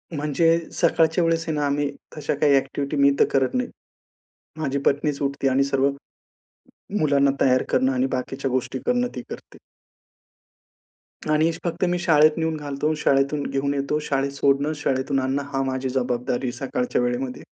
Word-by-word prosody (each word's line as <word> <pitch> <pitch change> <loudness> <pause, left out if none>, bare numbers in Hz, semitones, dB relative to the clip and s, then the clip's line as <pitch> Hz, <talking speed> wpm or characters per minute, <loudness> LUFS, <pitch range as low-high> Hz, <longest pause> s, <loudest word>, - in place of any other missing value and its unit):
म्हणजे 150 +3 +2
सकाळच्या 165 0 +2
वेळेस 165 0 +1
आहे 160 - -1
ना, 150 -1 0
आम्ही 145 0 0 0.3
तशा 150 -2 -1
काही 145 0 +3
ॲक्टिविटी 140 +2 -1
मी 140 0 +5
तर - - +6
करत 135 -1 +2
नाही. 250 0 -1 0.9
माझी 140 -3 -1
पत्नीचं 145 0 +1
उठते 140 0 0
आणि 135 +1 +2
सर्व 135 0 +1 1.1
मुलांना 140 -2 +3
तयार 130 -1 +4
करणं 130 +1 +2
आणि 130 0 +1
बाकीच्या 135 +1 -3
गोष्टी 130 0 -2
करणं 245 0 +1
ती 125 - -4
करते. - - -10 1.7
आणि 155 +2 +3
फक्त 170 +1 -2
मी 180 0 0
शाळेत 155 -2 +4
नेऊन 160 -1 -1
घालतो 145 +1 -2
शाळेतून 140 0 +1
घेऊन 140 +1 -1
येतो, 140 +2 -1
शाळेत 140 0 0
सोडणं, 140 +2 +1
शाळेतून 135 -1 -1
आणणं 135 +2 -1
हा 135 - 0
माझी 130 0 -2
जबाबदारी 125 0 -1
सकाळच्या 125 0 -2
वेळेमध्ये. 125 +1 -2
140 Hz, 155 wpm, -23 LUFS, 135-150 Hz, 1.7 s, तर